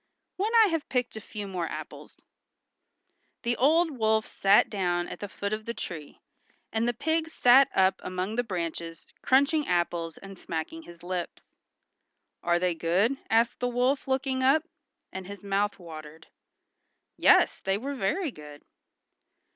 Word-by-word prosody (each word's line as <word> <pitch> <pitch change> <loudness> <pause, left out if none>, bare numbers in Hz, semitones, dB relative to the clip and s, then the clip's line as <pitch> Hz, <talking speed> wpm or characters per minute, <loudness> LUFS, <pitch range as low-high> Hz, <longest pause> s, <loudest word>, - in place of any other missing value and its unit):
"When 405 +4 0
I 445 -3 +7
have 325 -3 -2
picked 250 -3 -1
a 220 - -6
few 205 0 -7
more 180 -3 -3
apples." - - -9 1.2
The 240 0 0
old 320 +6 +4
wolf 220 0 +2
sat 200 +1 +4
down 175 -4 -1
at - - -8
the 205 - -6
foot 200 +1 -4
of 215 0 -4
the 235 - -4
tree, 155 -4 -7 0.5
and 225 +1 +1
the 240 - +1
pig 320 +5 0
sat 265 -2 +6
up 190 0 +3
among 185 +4 -3
the 245 - +1
branches 170 -5 -5
crunching 280 +3 +3
apples 170 -2 -1
and 195 -2 -11
smacking 165 - -5
his 170 - -14
lips. 180 -1 -6 0.9
"Are 175 0 +2
they 180 0 +1
good?" 185 +10 +1
asked 230 +1 +2
the 245 - 0
wolf 250 +3 0
looking 265 0 0
up; 275 +4 +4 0.5
and 190 -1 -6
his 200 +1 -9
mouth 200 +1 0
watered. 160 -3 -11 0.9
Yes, - - +4
they 195 0 0
were 275 +6 -4
very 275 - -1
good. 150 -5 -12
205 Hz, 155 wpm, -28 LUFS, 175-260 Hz, 1.2 s, I